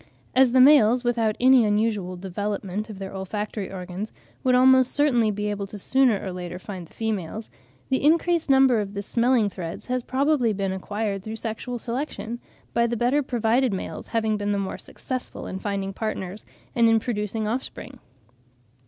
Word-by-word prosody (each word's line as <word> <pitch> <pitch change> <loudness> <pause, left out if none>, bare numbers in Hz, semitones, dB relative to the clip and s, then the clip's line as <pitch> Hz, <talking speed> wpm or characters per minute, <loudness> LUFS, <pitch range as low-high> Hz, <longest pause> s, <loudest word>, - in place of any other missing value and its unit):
As 260 -1 +5
the 260 - +4
males, 255 -3 +6
without 230 -3 +1
any 255 -1 +6
unusual 210 -3 0
development 200 +2 -4
of 210 - -8
their 195 0 -7
olfactory 205 +1 -4
organs, 185 +2 -6 0.3
would 255 -1 +4
almost 260 0 +5
certainly 250 -7 +3
be 210 0 -3
able 200 -1 -4
sooner 220 +3 +2
or 190 - -5
later 180 0 -6
to 180 - -16
find 185 -5 -7
the - - -23
females, 220 -1 -3 0.4
the 265 - +1
increased 335 +1 +3
number 265 -4 +5
of 200 0 -6
the 200 - -3
smelling 235 0 +2
threads 175 -4 -6
has 255 0 -1
probably 260 -2 +1
been 195 -1 -2
acquired 200 +1 -3
through 220 +3 -6
sexual 225 +2 -4
selection, 235 -2 -4 0.3
by 235 0 +3
the 235 0 -2
better 250 +6 +2
provided 245 0 +1
males 190 - -5
having 220 -2 0
been 205 0 -1
the - - 0
more 195 -1 -3
successful 255 -1 -6
in 190 - -5
finding 195 -1 -3
partners 200 -2 -4 0.3
and 230 -1 +5
in 225 0 +4
producing 215 -1 -2
offspring. 255 +2 -5
220 Hz, 170 wpm, -24 LUFS, 200-250 Hz, 0.4 s, males